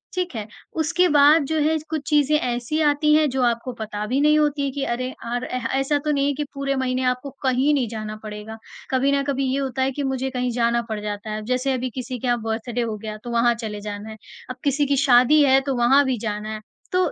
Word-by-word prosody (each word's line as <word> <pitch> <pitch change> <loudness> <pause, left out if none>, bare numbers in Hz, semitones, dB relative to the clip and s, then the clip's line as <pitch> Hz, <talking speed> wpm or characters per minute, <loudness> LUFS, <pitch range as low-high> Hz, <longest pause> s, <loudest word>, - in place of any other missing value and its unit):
ठीक 365 -4 -2
है, 215 -1 -4 0.3
उसके 335 +3 +2
बाद 295 +1 +6
जो 315 +2 -1
है 315 +2 +2
कुछ 315 -3 -2
चीज़ें 300 0 +3
ऐसी 245 +4 -2
आती 300 0 +3
हैं 305 -1 +4
जो 260 0 -1
आपको 235 +1 0
पता 210 -1 -4
भी 260 +4 0
नहीं 300 +1 +5
होती 295 -1 +1
है 270 - -2
कि 275 0 -3
अरे 255 +2 -2 0.2
अर 245 +1 -2
ऐसा 270 +4 -1
तो 300 - +2
नहीं 285 0 +1
कि 300 - -2
पूरे 275 0 -2
महीने 260 0 -1
आपको 250 +2 -1
कहीं 265 +3 +2
नहीं 260 -5 +1
जाना 215 -1 -5
पड़ेगा, 215 +1 -7 0.3
कभी 265 +2 +2
ना 280 0 +2
कभी 275 -1 -1
ये 275 - 0
होता 265 -1 -2
है 265 +1 +2
कि 285 +2 -4
मुझे 265 0 -1
कहीं 250 -1 -2
जाना 235 0 +1
पड़ 215 -1 -3
जाता 210 +1 -5
है 215 - -2
अब 215 - -9
जैसे 255 +2 0
अभी 255 0 -2
किसी 255 0 -4
के 255 - -3
यहाँ 240 -2 +1
बर्थडे 225 +2 -3
हो 225 -2 -2
गया 215 0 -6
तो 240 - -6
वहाँ 235 0 +3
चले 215 -3 -6
जाना 210 +1 -6
है 220 - -9 0.3
अब 255 - -4
किसी 285 0 +2
की 280 0 +1
शादी 265 +2 +5
है 270 -1 +5
तो 270 -1 -2
वहाँ 255 +4 +5
भी 260 -2 0
जाना 210 -1 -4
है, 215 - -6 0.3
तो 365 0 +2
255 Hz, 245 wpm, -23 LUFS, 235-285 Hz, 0.3 s, बाद